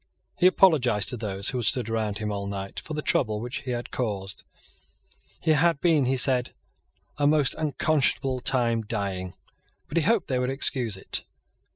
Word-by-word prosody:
He 180 - +6
apologised 130 - +3
to 125 - -1
those 100 -3 -2
who 130 - -2
had 120 - -2
stood 125 -2 +3
round 110 -3 -2
him 105 0 -3
all 100 -1 -4
night 100 -1 -5
for 155 - -7
the 150 - -3
trouble 110 -5 +1
which 120 +3 -5
he 130 - -8
had 120 -1 -4
caused. 100 -5 -4 1.0
He 160 - +1
had 160 0 +3
been, 160 -5 +3
he 130 +1 +1
said, 125 -1 +2 0.6
a 145 - +3
most 150 -3 +3
unconscionable 145 -3 0
time 120 -3 +1
dying; 100 -4 -4 0.5
but - - -4
he 165 - +3
hoped 215 +1 +2
that - - -3
they 125 - +1
would 125 0 -1
excuse 125 -5 +1
it. - - -3
125 Hz, 185 wpm, -25 LUFS, 105-145 Hz, 1.0 s, He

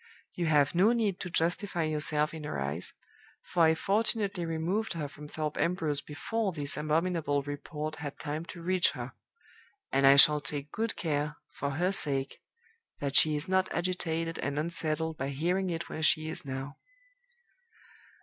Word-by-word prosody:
You 175 -2 -2
have 145 -2 +3
no 195 +7 +4
need 210 -5 0
to 180 - -4
justify 175 +1 0
yourself 150 0 0
in 160 -1 -7
her 145 - -4
eyes, 70 +6 -2 0.5
for 170 -2 +3
I 160 0 +4
fortunately 200 -1 +1
removed 175 +8 -1
her 155 -4 -3
from 150 +1 -11
Thorpe 150 0 -4
Ambrose 160 -5 0
before 195 +9 -2
this 145 -2 -1
abominable 155 -1 0
report 150 +2 -5
had 145 -2 -6
time 155 +1 -4
to 170 -1 -9
reach 185 +1 +2
her; - - -6 0.8
and 135 0 +4
I 135 - +8
shall 150 +1 +7
take 145 +1 -1
good 225 0 -2
care, 150 -2 -1 0.2
for 140 - -3
her 180 +5 +1
sake, 140 -7 +2 0.6
that 140 -1 -3
she 155 -1 +6
is 150 +4 -2
not 190 0 +1
agitated 165 -2 -1
and 140 0 -2
unsettled 160 0 -1
by 135 +1 -2
hearing 175 +7 0
it 170 -1 -3
where 155 - -6
she 155 0 +3
is 160 - -6
now. 135 +1 -5
160 Hz, 165 wpm, -30 LUFS, 145-175 Hz, 0.8 s, I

